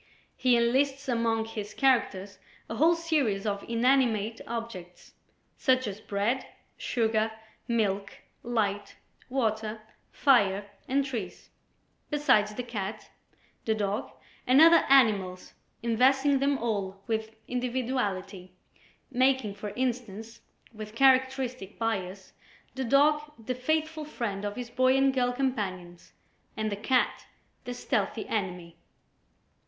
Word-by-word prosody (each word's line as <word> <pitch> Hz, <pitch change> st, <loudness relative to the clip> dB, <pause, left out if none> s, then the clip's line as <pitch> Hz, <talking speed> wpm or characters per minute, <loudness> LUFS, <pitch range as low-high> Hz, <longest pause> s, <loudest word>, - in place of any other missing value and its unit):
He 250 Hz, -2 st, +3 dB
enlists 270 Hz, +4 st, +1 dB
among 230 Hz, -2 st, +1 dB
his 215 Hz, -2 st, -7 dB
characters 205 Hz, -7 st, +1 dB, 0.3 s
a 225 Hz, -, -5 dB
whole 330 Hz, +6 st, +5 dB
series 290 Hz, -12 st, 0 dB
of 200 Hz, -1 st, -2 dB
inanimate 230 Hz, -3 st, +2 dB
objects, 225 Hz, -7 st, -7 dB, 0.4 s
such 255 Hz, -1 st, +2 dB
as 205 Hz, 0 st, -5 dB
Bread, 210 Hz, +6 st, -1 dB, 0.3 s
Sugar, 220 Hz, -2 st, 0 dB, 0.4 s
Milk, 200 Hz, -4 st, -1 dB, 0.2 s
Light, 205 Hz, -4 st, -2 dB, 0.3 s
Water, 220 Hz, -4 st, -1 dB, 0.3 s
Fire 205 Hz, -7 st, +3 dB, 0.2 s
and 275 Hz, +1 st, +1 dB
Trees, 220 Hz, -10 st, -6 dB, 0.6 s
besides 215 Hz, -8 st, +2 dB
the 250 Hz, -, -3 dB
Cat, 215 Hz, -3 st, -6 dB, 0.5 s
the 220 Hz, -, +1 dB
Dog 205 Hz, 0 st, -2 dB, 0.4 s
and 255 Hz, +2 st, +6 dB
other 330 Hz, +1 st, +7 dB
animals, 205 Hz, -9 st, +3 dB, 0.3 s
investing 265 Hz, +4 st, +3 dB
them 280 Hz, +1 st, +2 dB
all 200 Hz, -5 st, -3 dB
with 220 Hz, -1 st, -3 dB
individuality, 240 Hz, -7 st, -3 dB, 0.6 s
making 260 Hz, -4 st, +2 dB
for 205 Hz, +1 st, -6 dB
instance, 235 Hz, -3 st, -4 dB, 0.3 s
with 215 Hz, 0 st, -9 dB
characteristic 260 Hz, -4 st, +2 dB
bias, 195 Hz, -4 st, -3 dB, 0.4 s
the 265 Hz, -, -3 dB
Dog 290 Hz, +4 st, +4 dB, 0.2 s
the 225 Hz, +2 st, -4 dB
faithful 315 Hz, +4 st, -1 dB
friend 210 Hz, -8 st, -4 dB
of 205 Hz, 0 st, -3 dB
his 245 Hz, -2 st, -6 dB
boy 255 Hz, +2 st, +3 dB
and 270 Hz, 0 st, +3 dB
girl 250 Hz, -1 st, +1 dB
companions 195 Hz, -10 st, -4 dB, 0.4 s
and 215 Hz, -1 st, -1 dB
the -, -, -1 dB
Cat 245 Hz, +5 st, 0 dB, 0.4 s
their 245 Hz, -, -5 dB
stealthy 215 Hz, -2 st, -2 dB
enemy. 180 Hz, -5 st, -4 dB
230 Hz, 115 wpm, -28 LUFS, 205-260 Hz, 0.6 s, other